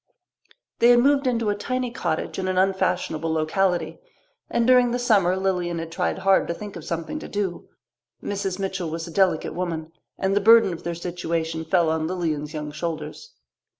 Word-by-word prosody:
They 235 - +6
had 245 - +7
moved 275 +2 +3
into 230 -4 +1
a - - -1
tiny 255 +3 -2
cottage 250 -5 -3
in 190 - -2
an 185 0 -1
unfashionable 180 -4 0
locality, 165 +1 0 0.5
and 235 - +1
during 250 0 +5
the 240 - 0
summer 200 -7 +3
Lilian 180 -3 -1
had 165 0 -5
tried 180 +2 -1
hard 195 0 +3
to 170 - -2
think 205 +1 -8
of 170 - -8
something 170 - -4
to - - -8
do. 200 -4 -3 0.5
Mrs. 195 -2 -2
Mitchell 190 -3 -3
was 165 +1 -4
a - - -8
delicate 185 -3 +1
woman, 165 -2 -4 0.3
and 195 +1 0
the 205 - +3
burden 225 -2 +6
of 165 - -8
their 170 0 -4
situation 165 -2 -3
fell 170 0 +2
on 160 0 -1
Lilian's 160 -4 -2
young 150 -1 -5
shoulders. 160 - -6
180 Hz, 185 wpm, -24 LUFS, 165-205 Hz, 0.5 s, had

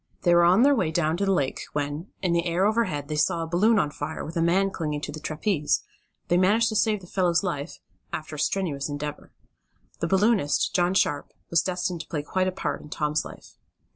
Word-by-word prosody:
They 175 - +4
were 175 0 +6
on 185 +7 +5
their 285 +1 +6
way 225 - +1
down 160 0 0
the 195 +1 +1
lake 140 -8 0
when, 145 +4 -3 0.2
in 180 -2 +2
the 170 +1 +1
air 175 +3 +1
overhead 200 -10 0
they 155 - -3
saw 165 +3 +1
a - - -5
balloon 210 +7 +3
on 150 -7 +1
fire, 150 +2 -5
with 165 - -8
a 165 - +1
man 190 +4 +2
clinging 150 -5 -3
to - - -5
the 155 - -7
trapeze. 155 +1 0 0.4
They 175 - +3
managed 210 +6 +3
to 215 - -4
save 215 -1 +2
the - - -12
fellow's 175 -1 +1
life, 165 -4 -4 0.3
after 155 0 -5
a - - -7
strenuous 155 -6 -1
endeavor. 145 0 -6 0.7
The 170 - -1
balloonist, 195 -4 +2
John 180 0 +2
Sharp, 145 -6 +1 0.2
was 170 - +4
destined 180 -2 -2
to - - -12
play 150 -3 -3
quite 185 +5 0
a - - 0
part 185 - -3
in 150 - -12
Tom's 150 0 -1
life. - - -12
170 Hz, 220 wpm, -25 LUFS, 150-190 Hz, 0.7 s, were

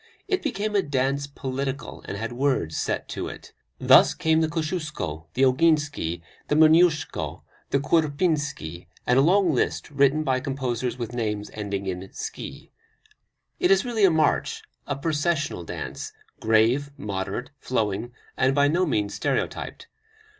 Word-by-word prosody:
It 380 -2 0
became 215 -7 -2
a 200 - +5
dance 140 -2 0
political, 135 -1 -4
and 100 - -4
had 115 +3 -4
words 125 - 0
set - - -2
to - - -4
it. - - -10 0.2
Thus - - +6
came 160 0 +2
the 160 - +2
Kosciuszko, 155 - -3
the 130 - +3
Oginski, 145 - +2 0.2
the 150 - +1
Moniuszko, 160 0 +3 0.3
the - - +2
Kurpinski, 145 - 0 0.2
and 125 +2 +4
a - - +6
long 180 +2 +4
list 130 - -1
written 140 +2 +3
by 130 -3 +1
composers 130 -3 -2
with 120 -1 -5
names 105 -3 -2
ending 100 -2 -4
in 95 0 -5
"ski." - - -7 0.9
It 360 - +3
is 390 -8 +4
really 230 -4 0
a 195 - +8
march, 160 -2 +1 0.2
a - - -1
processional 150 - -1
dance, - - -6 0.3
grave, 115 +6 +3
moderate, 100 +5 -4
flowing, 110 -2 -1 0.2
and 135 +1 +2
by 145 0 +4
no 175 +4 +2
means 105 -7 0
stereotyped. - - -2
140 Hz, 145 wpm, -25 LUFS, 110-155 Hz, 0.9 s, a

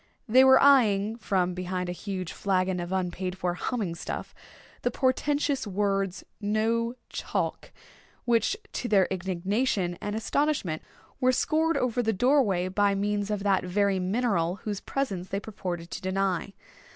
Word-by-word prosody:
They 255 +4 +6
were 265 0 +7
eyeing, 220 -7 +4
from 185 -5 0
behind 180 0 -3
a - - -2
huge 185 -1 -5
flagon 185 -2 0
of 175 +1 -5
unpaid 185 0 -2
for 180 -1 -1
"humming 200 -1 -2
stuff," 165 -1 -6 0.5
the - - +1
portentous 280 0 0
words, 195 -1 -1 0.2
"No 225 +3 0
Chalk," - - -3 0.5
which 235 - +2 0.2
to 245 - -3
their 195 -5 +4
indignation 190 +1 -1
and 205 0 -3
astonishment 225 - 0 0.4
were 255 -1 +4
scored 320 +5 +1
over 250 -1 +1
the 220 -1 +1
doorway 210 -6 +3
by 200 +1 +2
means 205 +1 -1
of 205 -2 -2
that 195 -2 +2
very 195 +1 +1
mineral 185 -3 0
whose 205 -2 -3
presence 195 -10 -3
they 195 - -1
purported 180 -5 -6
to - - -5
deny. 190 0 -1
200 Hz, 145 wpm, -27 LUFS, 185-230 Hz, 0.5 s, were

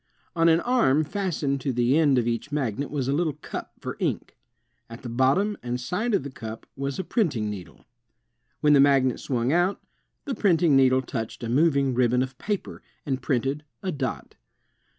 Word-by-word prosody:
On 165 0 +4
an 165 +1 +4
arm 225 - +3
fastened 155 -5 -2
to 135 - -1
the 120 +2 +2
end 150 -4 +4
of 120 -1 +1
each 120 +5 -2
magnet 140 -2 -2
was 140 -4 -2
a 135 - +1
little 155 0 0
cup 150 - -8
for - - -6
ink. - - -2 0.5
At 115 0 -10
the 120 - -5
bottom 135 - +1
and 125 0 -3
side 205 - -1
of 150 - 0
the 140 - -6
cup 110 -3 -8
was 140 0 -3
a 190 - -2
printing 140 - 0
needle. 95 -4 -10 0.8
When 150 -1 +5
the 140 - +6
magnet 135 -2 +4
swung 125 0 -1
out, 175 +3 +2 0.5
the 280 - -2
printing 170 - +3
needle 130 -1 +4
touched 115 -1 -5
a 115 - -3
moving 140 0 +3
ribbon 125 0 +2
of 130 -1 -8
paper, 205 -2 -4 0.2
and 135 -3 -2
printed 135 +3 -1 0.2
a 190 - -1
dot. 135 -5 -4
140 Hz, 185 wpm, -25 LUFS, 125-165 Hz, 0.8 s, the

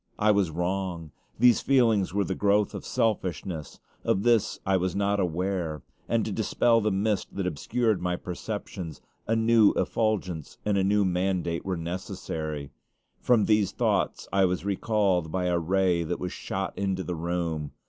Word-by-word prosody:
I 105 0 +4
was 100 -4 +2
wrong. 90 -1 -3 0.3
These 120 0 +5
feelings 115 -7 +3
were 100 +2 +1
the 95 - -2
growth 100 +1 +2
of - - -7
selfishness. 90 - -2 0.2
Of 95 - +1
this 120 -3 +3
I 95 - +2
was 95 -1 0
not 100 0 +1
aware; 90 -3 -2 0.3
and - - +1
to - - -3
dispel 115 -1 +2
the 110 - +1
mist 105 +1 -1
that 100 - -2
obscured 110 +6 0
my 90 0 0
perceptions, 90 -2 -6 0.3
a 115 - +2
new 115 -1 +5
effulgence 95 -8 -1
and 105 -1 +1
a 95 - +2
new 100 +1 +3
mandate 90 -2 0
were 95 -2 -2
necessary. 80 -4 -5 0.5
From 120 -4 +3
these 105 -3 +2
thoughts - - 0
I 100 0 +4
was 90 0 0
recalled 100 -4 +1
by 90 0 -1
a 90 -1 +1
ray 90 0 +2
that 85 +2 -3
was 90 -1 -4
shot - - -4
into 95 -1 -1
the 90 - -3
room. 85 -3 -2
95 Hz, 165 wpm, -27 LUFS, 85-105 Hz, 0.5 s, These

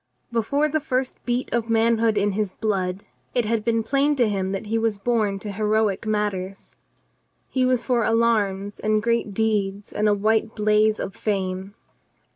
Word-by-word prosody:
Before 260 +6 +1
the 310 +1 0
first 260 -3 -2
beat 245 +1 -1
of 235 -1 0
manhood 225 -1 +3
in 205 0 +2
his 200 -1 -2
blood 195 -3 -2 0.3
it 245 -2 +2
had 220 0 0
been 230 0 +1
plain 280 +5 +2
to 245 -4 +3
him 190 -2 -1
that 195 +2 -4
"he 225 +2 0
was 225 -2 0
born 210 -2 0
to 205 +1 -6
heroic 215 0 0
matters. 195 -3 -3 0.7
He 255 -1 +1
was 250 -2 +1
for 245 -3 +2
alarms 210 -3 +1
and 215 0 +1
great 235 -2 0
deeds 205 -2 -1
and 210 0 +2
a 205 - +3
white 220 +2 +1
blaze 215 0 +3
of 190 - -5
fame. 190 -1 -3
215 Hz, 170 wpm, -23 LUFS, 200-230 Hz, 0.7 s, manhood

